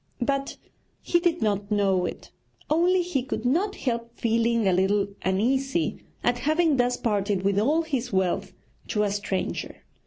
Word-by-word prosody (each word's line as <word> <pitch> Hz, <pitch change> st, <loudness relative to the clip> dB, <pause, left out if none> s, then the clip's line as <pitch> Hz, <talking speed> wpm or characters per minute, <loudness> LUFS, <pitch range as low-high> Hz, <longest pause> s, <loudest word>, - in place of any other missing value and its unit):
But 275 Hz, +1 st, -1 dB, 0.5 s
he 345 Hz, -, +2 dB
did 345 Hz, -3 st, +1 dB
not 205 Hz, -1 st, 0 dB
know 195 Hz, -4 st, +2 dB
it, -, -, -8 dB, 0.4 s
only 355 Hz, +3 st, +3 dB
he 340 Hz, -7 st, -1 dB
could 245 Hz, -2 st, -4 dB
not 360 Hz, +11 st, +1 dB
help 235 Hz, -2 st, -3 dB
feeling 230 Hz, -1 st, +1 dB
a 190 Hz, -, +4 dB
little 195 Hz, +2 st, +2 dB
uneasy 265 Hz, -, 0 dB, 0.2 s
at 245 Hz, 0 st, +1 dB
having 310 Hz, +2 st, +2 dB
thus 245 Hz, 0 st, +2 dB
parted 205 Hz, -3 st, 0 dB
with 200 Hz, 0 st, +2 dB
all 300 Hz, +9 st, +2 dB
his 265 Hz, -6 st, -3 dB
wealth 190 Hz, 0 st, 0 dB, 0.4 s
to 210 Hz, -, 0 dB
a 205 Hz, -, 0 dB
stranger. 200 Hz, -2 st, -3 dB
235 Hz, 155 wpm, -26 LUFS, 200-280 Hz, 0.5 s, a